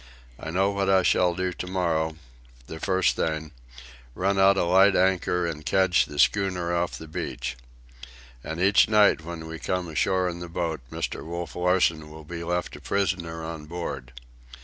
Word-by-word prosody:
I - - -6
know 95 +4 +1
what 100 -1 -1
I 95 -1 +4
shall 90 -1 +3
do 90 0 -2
to 90 - -6
morrow, 85 -4 0 0.5
the 80 - -8
first 95 0 +1
thing—run 60 +3 -4
out 95 0 +5
a - - +2
light 95 +3 +5
anchor 90 -1 +2
and 80 -3 -4
kedge 95 +2 +3
the 75 - -9
schooner 90 0 +2
off 85 0 -1
the 80 - -10
beach. 80 - -4 0.9
And 80 +1 -5
each 100 +4 +4
night 105 -5 +5
when 85 -1 -7
we 80 0 -7
come 90 -1 -2
ashore 90 +4 +1
in 85 -1 -4
the 85 0 -7
boat, 85 -4 -3
Mr. - - -4
Wolf 85 -1 -6
Larsen 90 -3 +1
will 80 0 -11
be 85 +2 -6
left 90 +1 -2
a - - -12
prisoner 85 -4 -2
on 80 -2 -7
board. 70 -7 -5
85 Hz, 170 wpm, -26 LUFS, 80-95 Hz, 0.9 s, out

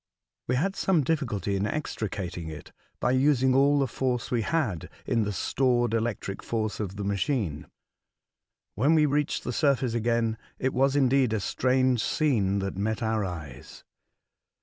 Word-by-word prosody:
We 125 - +1
had 190 +9 0
some 175 -6 +2
difficulty 115 - -1
in 100 +2 0
extricating 95 - -4
it, 80 - -9 0.3
by - - +1
using 130 -1 +3
all 140 +2 +4
the 140 - +3
force 125 -1 -2
we 120 -2 +1
had 110 - -1 0.2
in 115 -3 +1
the 105 - -2
stored 120 +4 +1
electric 115 -3 -2
force 110 -2 -2
of 100 -3 -4
the 100 - -4
machine. 100 - -1 1.1
When 140 +10 +3
we 155 -1 +5
reached 150 0 0
the 125 - -3
surface 130 -3 +1
again, 115 -1 0 0.2
it 130 0 -1
was 135 +2 +2
indeed 135 -3 +3
a 110 - +1
strange 130 +2 +1
scene 110 -11 +1
that 95 -1 -3
met 110 +3 -1
our 110 -1 0
eyes. 75 -9 -8
120 Hz, 155 wpm, -27 LUFS, 100-135 Hz, 1.1 s, we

